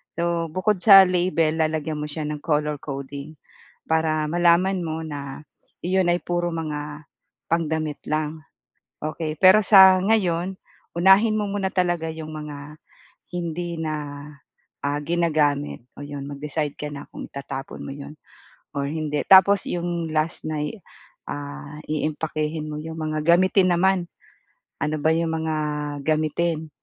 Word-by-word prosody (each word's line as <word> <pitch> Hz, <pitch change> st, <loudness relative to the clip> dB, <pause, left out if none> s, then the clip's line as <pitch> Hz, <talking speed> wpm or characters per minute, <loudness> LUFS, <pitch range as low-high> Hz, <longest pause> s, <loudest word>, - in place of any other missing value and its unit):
So 170 Hz, 0 st, 0 dB
bukod 185 Hz, +4 st, 0 dB
sa 195 Hz, -3 st, +10 dB
label, 175 Hz, -3 st, +1 dB
lalagyan 155 Hz, -1 st, -1 dB
mo 150 Hz, -, -3 dB
siya 155 Hz, +1 st, -4 dB
ng 150 Hz, 0 st, -4 dB
color 150 Hz, -2 st, 0 dB
coding. 140 Hz, +2 st, -7 dB, 0.5 s
Para 160 Hz, -1 st, +1 dB
malaman 175 Hz, +2 st, +3 dB
mo 160 Hz, -1 st, -3 dB
na 145 Hz, -1 st, -7 dB, 0.4 s
yun 185 Hz, 0 st, +2 dB
ay 175 Hz, +1 st, +1 dB
puro 175 Hz, 0 st, -1 dB
mga 150 Hz, -1 st, -5 dB, 0.5 s
pangdamit 160 Hz, -2 st, -1 dB
lang. 155 Hz, +1 st, -2 dB, 0.6 s
Okey, 155 Hz, 0 st, -3 dB
pero 190 Hz, +5 st, +7 dB
sa 190 Hz, -2 st, +8 dB
ngayon, 190 Hz, -3 st, +1 dB, 0.4 s
unahin 195 Hz, +5 st, +5 dB
mo 210 Hz, -, 0 dB
muna 200 Hz, -2 st, -1 dB
talaga 175 Hz, -3 st, 0 dB
yung 160 Hz, -1 st, -7 dB
mga 150 Hz, 0 st, -8 dB, 0.5 s
hindi 170 Hz, 0 st, -3 dB
na, 145 Hz, -2 st, -4 dB, 0.6 s
ah, 145 Hz, +1 st, 0 dB
ginagamit, 150 Hz, -5 st, 0 dB
oh 145 Hz, -, -7 dB
'yon 140 Hz, -1 st, -6 dB
mag-decide 145 Hz, +1 st, -3 dB
ka 150 Hz, -, -4 dB
na 140 Hz, -, -8 dB
kung -, -, -7 dB
itatapon 135 Hz, -1 st, -7 dB
mo -, -, -7 dB
'yon 145 Hz, +1 st, -9 dB, 0.6 s
or 140 Hz, -1 st, -2 dB
hindi. 150 Hz, -1 st, -2 dB
Tapos 195 Hz, +1 st, +7 dB
'yong 170 Hz, -2 st, -2 dB
last 155 Hz, +1 st, -1 dB
na'y 155 Hz, +7 st, -3 dB, 0.5 s
ah, 70 Hz, -, -7 dB
iimpakehin 155 Hz, 0 st, -2 dB
mo 150 Hz, -, -5 dB
'yong 160 Hz, 0 st, -7 dB
mga 155 Hz, -1 st, -2 dB
gamitin 185 Hz, 0 st, +3 dB
naman, 185 Hz, 0 st, +2 dB, 0.8 s
ano 155 Hz, 0 st, 0 dB
ba 160 Hz, +2 st, +3 dB
'yong 165 Hz, 0 st, 0 dB
mga 160 Hz, -1 st, -1 dB, 0.5 s
gamitin. 155 Hz, +1 st, 0 dB
155 Hz, 135 wpm, -23 LUFS, 150-175 Hz, 0.8 s, sa